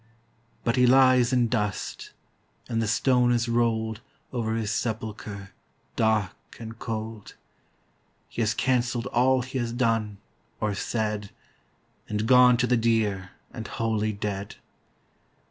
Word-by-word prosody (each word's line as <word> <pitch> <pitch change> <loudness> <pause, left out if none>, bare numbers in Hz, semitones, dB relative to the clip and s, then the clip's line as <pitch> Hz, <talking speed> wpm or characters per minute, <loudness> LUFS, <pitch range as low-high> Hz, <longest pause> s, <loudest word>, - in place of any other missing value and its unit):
But 115 +2 0
he 125 0 +5
lies 130 -1 +5
in 125 -2 +3
dust, 105 -4 -3 0.6
And 115 -2 -1
the 110 - -1
stone 125 +2 +3
is 120 0 +1
rolled 115 -1 0 0.3
Over 110 -2 -1
his 110 -2 -2
sepulchre 105 -3 -4 0.4
dark 110 -4 -1
and 115 0 -8
cold. 110 -2 -6 0.9
He - - -4
has 110 0 +1
cancelled 120 -2 0
all 130 +1 +2
he 130 +1 -4
has 120 -1 -2
done, 115 -4 0 0.4
or 105 -1 0
said, 105 0 -2 0.8
And 105 0 -1
gone 125 0 +6
to 120 - +2
the 125 0 +2
dear 110 -5 0 0.2
and 115 -3 -6
holy 110 -2 -1
Dead. 100 -1 -4
115 Hz, 130 wpm, -26 LUFS, 105-120 Hz, 0.9 s, gone